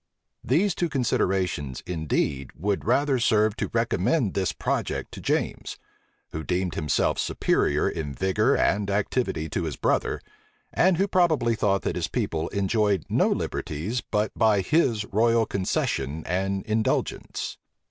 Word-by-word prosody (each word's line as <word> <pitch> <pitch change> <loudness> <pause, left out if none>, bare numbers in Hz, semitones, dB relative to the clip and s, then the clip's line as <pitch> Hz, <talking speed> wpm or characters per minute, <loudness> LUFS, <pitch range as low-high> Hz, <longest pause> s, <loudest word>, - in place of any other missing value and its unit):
These 170 - +2
two 175 -1 -1
considerations, 95 - -1
indeed, 75 -5 -1
would 100 +4 -2
rather 135 +2 +2
serve 110 -2 +3
to - - -2
recommend 115 - +1
this 95 -4 0
project - - -2
to - - -9
James; - - -2 0.5
who 80 - -5
deemed 90 0 -1
himself 75 -1 0
superior - - +1
in 75 -3 -3
vigor 95 0 +2
and 100 0 +1
activity 100 -5 -1
to 85 - -2
his 80 - -3
brother, - - 0 0.5
and 185 -1 +3
who 195 +3 +2
probably 160 -11 +2
thought 100 -3 +1
that - - -1
his - - -1
people 80 0 -2
enjoyed 100 -2 +1
no - - +3
liberties 95 +12 -2
but 105 0 -1
by 110 -3 +3
his 115 - +1
royal 115 +2 +2
concession 80 -6 -1
and 95 +2 -1
indulgence. 110 0 -2
100 Hz, 135 wpm, -25 LUFS, 90-120 Hz, 0.5 s, serve